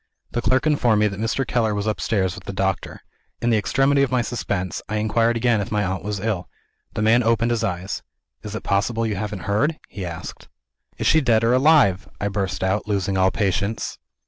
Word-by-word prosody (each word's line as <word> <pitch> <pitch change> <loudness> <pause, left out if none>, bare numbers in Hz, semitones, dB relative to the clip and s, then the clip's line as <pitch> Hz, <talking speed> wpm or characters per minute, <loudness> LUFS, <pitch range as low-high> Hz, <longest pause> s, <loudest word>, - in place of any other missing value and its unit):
The 120 - -1
clerk 130 +3 +2
informed 125 -8 +3
me 105 - +4
that 95 0 -7
Mr. 115 +4 0
Keller 110 -3 0
was 100 0 -2
upstairs 105 -3 0
with - - -11
the - - -5
doctor. - - -2 0.4
In 120 - +1
the 110 - +4
extremity 135 +7 +2
of 140 - +2
my 125 -1 +1
suspense, 100 -5 -3
I 110 - -2
inquired 115 +2 +1
again 115 -2 +2
if 100 - -5
my 105 -1 +1
aunt 95 0 -2
was 105 -1 -3
ill. 95 -4 -2 0.5
The 105 - 0
man 115 +3 +5
opened 115 0 +2
his 115 -2 0
eyes. 95 -2 -3 0.4
"Is 105 0 -7
it - - -5
possible 115 +4 0
you 110 -2 -1
haven't 100 -1 -4
heard?" 140 +11 +1
he 100 - -8
said. 85 -2 -7 0.5
"Is - - -3
she 160 - +5
dead 115 -4 +3
or 115 +2 +3
alive?" 130 - +4
I 100 - -1
burst 95 -2 -2
out, 95 +3 0
losing 100 -2 0
all 95 0 +4
patience. 100 +1 -1
110 Hz, 210 wpm, -22 LUFS, 100-120 Hz, 0.5 s, man